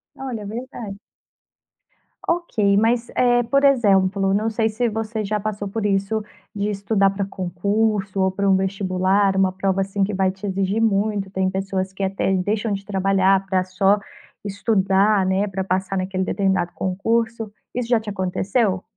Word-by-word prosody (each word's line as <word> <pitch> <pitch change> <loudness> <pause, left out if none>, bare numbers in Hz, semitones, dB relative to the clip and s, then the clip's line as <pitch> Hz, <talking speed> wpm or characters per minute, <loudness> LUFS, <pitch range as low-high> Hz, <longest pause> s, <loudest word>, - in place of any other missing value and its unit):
Olha, 245 -6 -5
verdade. 225 -2 -7 1.3
Ok, 220 -13 +1
mas, 230 +3 +2
eh, 245 -1 +3
por 275 +4 +1
exemplo, 195 -7 +3
não 215 +3 +1
sei 220 0 0
se 235 +3 -1
você 220 0 -3
já 210 +1 -1
passou 205 -1 -4
por 210 +2 -3
isso 200 +2 0 0.3
de 205 0 -2
estudar 200 0 +1
para 200 0 -2
concurso 195 +2 -1
ou 190 0 +3
para 200 +1 -1
um 190 - +5
vestibular, 190 0 +1
uma 190 -1 +3
prova 190 0 0
assim 195 +1 -1
que 205 +2 -1
vai 190 -1 +2
te 190 +2 -7
exigir 195 +2 0
muito, 205 -2 +1
tem 190 -1 0
pessoas 190 0 -3
que 195 - -4
até 195 0 0
deixam 205 +3 0
de 195 0 -5
trabalhar 195 -1 +2
para 190 -1 +1
só 195 +2 +2 0.4
estudar, 200 -1 +2
né, 190 +2 +1
para 190 -1 -3
passar 190 +1 -1
naquele 185 0 -1
determinado 190 -3 0
concurso, 225 +3 -1 0.2
isso 245 -1 -2
já 240 -2 +4
te 215 -1 -7
aconteceu? 190 +1 0
195 Hz, 160 wpm, -22 LUFS, 190-215 Hz, 1.3 s, um